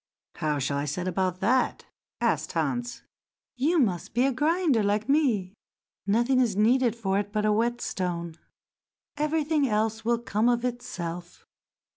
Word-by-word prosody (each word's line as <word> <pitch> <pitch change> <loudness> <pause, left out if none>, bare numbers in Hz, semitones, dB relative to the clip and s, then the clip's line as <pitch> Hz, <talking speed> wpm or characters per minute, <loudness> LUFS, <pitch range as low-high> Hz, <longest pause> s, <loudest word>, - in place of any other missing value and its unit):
"How 150 -1 0
shall 140 +1 -1
I 145 - -2
set 175 +5 -3
about 185 -1 -1
that?" 250 +5 +1 0.3
asked - - 0
Hans. 245 0 -2 0.5
"You 300 +8 +1
must 205 - 0
be 245 +2 +3
a 275 - +2
grinder 305 -2 +2
like 205 +2 0
me—nothing 235 -1 0
is 235 -6 +2
needed 235 +3 +3
for 195 -4 0
it 205 0 -4
but 210 0 0
a 215 - +3
whetstone; 185 -7 -2 0.8
everything 300 -1 +1
else 220 +1 0
will 235 +1 +2
come 230 0 0
of 240 0 +1
itself. 175 -8 -5
225 Hz, 140 wpm, -27 LUFS, 190-255 Hz, 0.8 s, be